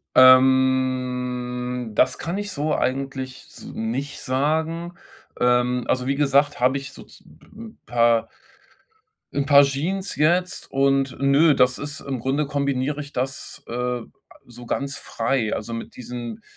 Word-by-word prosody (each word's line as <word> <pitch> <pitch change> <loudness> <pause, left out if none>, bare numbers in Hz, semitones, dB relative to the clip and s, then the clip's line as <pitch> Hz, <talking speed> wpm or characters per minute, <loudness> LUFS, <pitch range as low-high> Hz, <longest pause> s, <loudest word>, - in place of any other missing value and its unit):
Ähm, 125 -2 +3
das 130 +3 +3
kann 170 +4 -3
ich 205 0 -4
so 150 0 -1
eigentlich 130 0 -3
s - - -12
nicht 130 +6 -4
sagen. 160 +6 -1 0.5
Ähm, 125 0 +2
also 125 -1 0
wie 135 - 0
gesagt, 140 0 +2
habe 130 +2 +3
ich 140 0 -8
sozu - - -14
'n 215 - -14
paar 115 -1 +2 1.1
'n 140 -1 0
paar 145 -1 +8
Jeans 170 +8 -2
jetzt 175 +5 +1
und 135 -1 +1
ne, 140 +2 +4
das 125 0 +3
ist 145 +1 -6
im 135 -2 -4
Grunde 135 +5 0
kombiniere 140 0 -1
ich 145 0 -11
das, 135 +2 -4
äh, 125 +1 -2 0.4
so 120 0 -12
ganz 140 0 -2
frei. 120 -6 -1
Also 115 +2 -5
mit 115 - -7
diesen 120 -2 -7
135 Hz, 140 wpm, -23 LUFS, 125-145 Hz, 1.1 s, paar